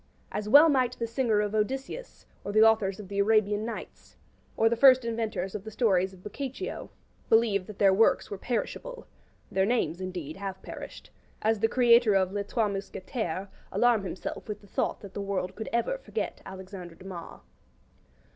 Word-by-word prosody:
As 210 0 -3
well 290 +7 +9
might 255 -4 +2
the 230 - -2
singer 230 -2 +1
of 210 0 -2
Odysseus, 265 - -3 0.2
or 200 - -4
the 215 +1 +5
authors 215 -3 +3
of 205 - -8
the 200 +1 -3
'Arabian 210 0 +3
Nights', 230 - -8 0.4
or 225 - +4
the 235 - +2
first 255 0 +6
inventors 220 -5 -2
of 210 - -5
the 220 - -7
stories 195 -4 +2
of 185 -1 -16
Boccaccio, 265 +5 -5 0.4
believe 215 -4 +3
that 210 - -9
their 195 -2 +5
works 220 +2 +3
were 200 - -4
perishable - - -4 0.5
(their 190 - +2
names, 200 -5 0
indeed, 180 -5 -5
have 195 -1 -5
perished), - - -9 0.3
as 220 0 +2
the 225 - +3
creator 235 -3 +5
of 190 -1 +2
'Les 200 0 -3
Trois 225 0 0
Mousquetaires' 195 -1 -4 0.2
alarm 240 -4 +3
himself 190 - -6
with 210 - -5
the - - -17
thought - - -2
that 200 -2 -10
the 205 - -4
world 195 -2 -2
could 220 - -5
ever 235 - 0
forget - - -4
Alexandre 190 -2 -9
Dumas. 185 -2 -9
210 Hz, 175 wpm, -28 LUFS, 195-235 Hz, 0.5 s, well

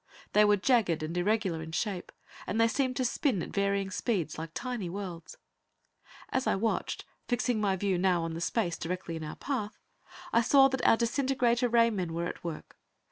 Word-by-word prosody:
They 210 - +6
were 210 0 +4
jagged 195 - +2
and 160 +2 -4
irregular 185 -2 0
in 160 0 -8
shape, 190 0 -2 0.4
and 210 +4 -1
they 230 - +5
seemed 255 +2 0
to 255 - 0
spin 240 - 0
at - - -7
varying 200 -1 0
speeds, 185 - -1
like 165 0 -5
tiny 245 -8 -3
worlds. 185 - -7 0.9
As 260 - -1
I - - +3
watched, 220 +3 -1 0.2
fixing 245 -2 0
my 195 -2 +2
view 190 -1 0
now 180 -2 +2
on 165 0 -3
the 165 - -5
space 175 -2 -1
directly 180 0 -4
in 160 - -5
our 150 - -6
path, 225 -7 -3 0.6
I 230 - +5
saw 270 +3 +6
that 265 -1 -3
our 225 - +6
disintegrator 245 0 +1
ray 230 0 +4
men 180 -6 -3
were 170 +1 -1
at - - -6
work. 170 -3 -7
205 Hz, 190 wpm, -30 LUFS, 175-235 Hz, 0.9 s, They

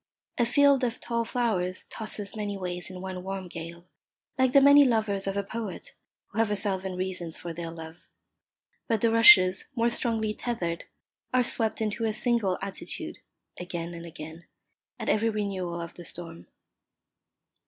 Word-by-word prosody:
A 240 - +3
field 280 +1 +4
of 240 -1 -1
tall 235 -1 -1
flowers 190 -7 -1
tosses 215 -1 -4
many 205 -2 -3
ways 180 -1 -4
in 185 -1 -8
one 185 -1 -5
warm 190 0 -5
gale, 170 0 -8 0.5
like 260 -1 +3
the 275 - +7
many 285 +1 +8
lovers 215 -6 +1
of 195 0 -1
a 200 - 0
poet 215 -2 -6 0.4
who 210 - -4
have 225 -2 +3
a 210 - +1
thousand 190 -2 -1
reasons 180 -3 -3
for 170 -1 -6
their 170 0 -5
love; 165 0 -10 0.8
but 225 -3 +1
the 230 - +3
rushes, 210 -5 +7
more 235 0 +2
strongly 225 -3 0
tethered, 175 -9 -3 0.5
are 255 - +5
swept 225 -2 0
into 220 +1 -1
a 215 -1 0
single 230 -7 +1
attitude, 195 -1 -5 0.4
again 175 -1 -5
and 170 0 -8
again, 160 +1 -9 0.5
at - - -5
every 225 +2 +3
renewal 195 -5 -2
of 170 -1 -6
the 175 - -10
storm. 165 -1 -7
195 Hz, 165 wpm, -28 LUFS, 175-230 Hz, 0.8 s, many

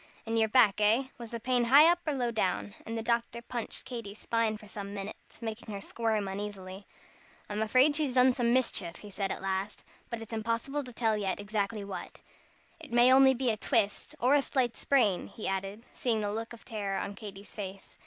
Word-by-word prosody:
"In 225 0 -2
your 220 -1 +3
back, 210 -3 +5
eh? 230 +6 +3
Was 235 -1 -7
the 235 - -5
pain 245 +1 +1
high 280 +6 +8
up 345 +1 +4
or 300 - +1
low 245 -3 0
down?" 100 - -1
And 230 +1 -3
the 225 - -3
doctor 235 0 0
punched 235 0 -6
Katy's 230 -5 -7
spine 230 -1 0
for 210 -1 -14
some 200 0 -7
minutes, 200 +4 -8
making 220 0 -5
her - - -4
squirm 220 0 -1
uneasily. 195 -1 -6 0.6
"I'm 210 +1 -3
afraid 255 +7 +4
she's 290 -4 +1
done 255 0 +6
some 240 -2 +1
mischief," 230 -9 +1
he 210 - -11
said 195 0 -2
at - - -5
last, 195 +2 -2 0.3
"but 235 - -4
it's 225 0 -9
impossible 230 +6 -2
to 250 - -8
tell 225 -2 +1
yet 200 -2 -2
exactly 205 0 -2
what. 190 -3 -7 0.6
It 315 -6 -10
may 240 +1 +6
be - - +6
only 265 -1 +5
a 215 - -3
twist, 225 +5 0
or 255 +3 +4
a 290 - +5
slight 255 -4 0
sprain," 220 -10 +2
he 215 - -6
added, 195 +4 -3
seeing 230 -3 0
the 205 0 -2
look 225 +1 -4
of 235 - -12
terror 200 -3 -3
on 200 - -3
Katy's 200 -1 -10
face. 195 -2 -8
225 Hz, 210 wpm, -30 LUFS, 205-245 Hz, 0.6 s, high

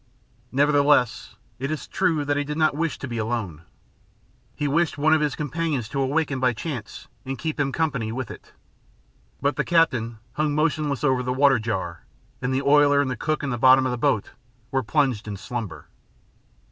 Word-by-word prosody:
Nevertheless, 140 -4 +2 0.2
it 135 +2 -2
is 155 -3 -3
true 165 -6 0
that 145 0 +1
he 145 - 0
did 150 +1 -5
not 155 -2 +3
wish 165 +1 -1
to 140 - -6
be 120 -2 -4
alone. 110 -8 -3 0.9
He 150 - -1
wished 160 +3 +1
one 155 +2 +3
of 160 - +3
his 150 -3 0
companions 150 -5 -2
to 135 - -2
awaken 140 0 0
by 125 -1 +2
chance 125 -1 -6 0.2
and 135 0 -4
keep 155 +3 -4
him 140 -1 +1
company 135 -8 -1
with 125 +1 -4
it. - - -12 0.9
But 140 +1 +1
the - - +1
captain 125 -10 +2 0.2
hung 150 -1 0
motionless 150 -2 0
over 130 -3 +2
the 125 0 -2
water 135 -1 +4
jar, 95 -6 -4 0.4
and 125 - -1
the 130 +1 0
oiler 145 0 +5
and 140 -2 +1
the - - -2
cook 155 +4 -2
in 135 - -2
the 120 - -3
bottom 130 +1 +6
of 130 - 0
the 125 - -2
boat 110 -3 +1 0.4
were 135 - +1
plunged 125 -4 0
in 100 -1 -5
slumber. 100 - -6
135 Hz, 190 wpm, -24 LUFS, 120-150 Hz, 0.9 s, bottom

